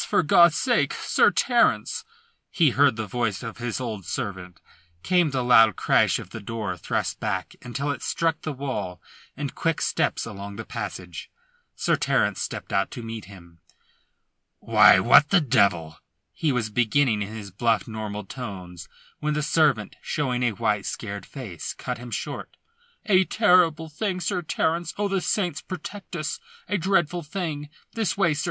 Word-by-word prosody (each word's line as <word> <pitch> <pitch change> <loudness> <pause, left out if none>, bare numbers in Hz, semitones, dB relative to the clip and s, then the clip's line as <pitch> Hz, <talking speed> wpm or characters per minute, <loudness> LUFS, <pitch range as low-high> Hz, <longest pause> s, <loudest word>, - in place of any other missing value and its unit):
For - - +2
God's 170 +1 +6
sake, 245 -2 +1
Sir - - +3
Terence!" 255 - +1 0.4
he 160 -7 +3
heard 140 -1 +4
the 110 0 -3
voice 115 -2 -2
of 115 0 -7
his 120 0 -3
old 110 -6 -4
servant. 90 -3 -5 0.4
Came 180 -3 +3
the 130 -2 -1
loud 115 -4 +6
crash - - +3
of - - -9
the - - -6
door 110 -3 -4
thrust 105 +2 -2
back 95 -6 -3
until 140 +4 -3
it 135 - -5
struck 165 -1 0
the 155 - -3
wall 105 - -4 0.4
and 140 -2 -4
quick 165 -1 -1
steps - - 0
along 100 -2 -7
the - - -7
passage. 90 -2 -6 0.5
Sir - - +1
Terence - - +1
stepped - - -5
out 100 - +1
to 120 - -8
meet 115 -1 -6
him. 85 -4 -15 1.0
"Why, - - +6
what 145 - +6
the 200 - +5
devil 100 - +1 0.2
" - - -53
he 155 - +3
was 115 -4 -1
beginning 120 0 +2
in 105 +2 -5
his 100 -3 -8
bluff, 115 +4 +1
normal 105 -2 -5
tones, 95 -8 -8 0.3
when 150 0 -1
the 150 - -1
servant, 140 - +2
showing 130 -5 -1
a 120 -3 +1
white, 105 -2 -1
scared 100 -2 -5
face, 115 - -7
cut 125 -2 -5
him 120 0 -8
short. - - -5 0.5
"A 190 -3 +5
terrible 180 -6 +3
thing, 185 +4 -3
Sir 180 +1 -1
Terence! 165 +1 -1
Oh, 205 0 0
the 195 -1 0
saints 180 -3 -1
protect 185 +2 -8
us, 155 - -3 0.3
a 205 - 0
dreadful 175 -1 +1
thing! 150 -3 -4 0.2
This 220 -5 -1
way, 170 -6 +3
sir! 145 - -4
125 Hz, 170 wpm, -25 LUFS, 105-165 Hz, 1.0 s, God's